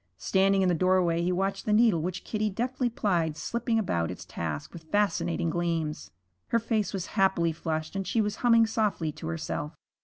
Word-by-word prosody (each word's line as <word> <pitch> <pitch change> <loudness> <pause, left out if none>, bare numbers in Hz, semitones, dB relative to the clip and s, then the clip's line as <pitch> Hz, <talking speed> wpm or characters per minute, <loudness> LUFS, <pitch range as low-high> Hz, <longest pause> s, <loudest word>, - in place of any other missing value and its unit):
Standing 195 0 +2
in - - +3
the - - +3
doorway 175 -1 +2
he 175 +1 +1
watched 195 +4 -1
the - - +2
needle 210 -6 +4
which 180 +2 -4
Kitty 215 -1 -1
deftly 245 +4 -1
plied 170 -9 0
slipping 235 +3 -1
about 85 - 0
its - - -7
task 80 -3 -5
with 165 -2 -10
fascinating 175 -3 0
gleams. 165 - -2 0.4
Her 230 - +2
face 220 -3 0
was 190 -2 -3
happily 190 -4 +2
flushed 160 +1 -4
and 195 -1 -2
she 230 - 0
was 210 -1 0
humming 230 -2 +5
softly 210 -8 0
to 140 - -8
herself. 80 -2 -4
185 Hz, 185 wpm, -28 LUFS, 165-215 Hz, 0.4 s, humming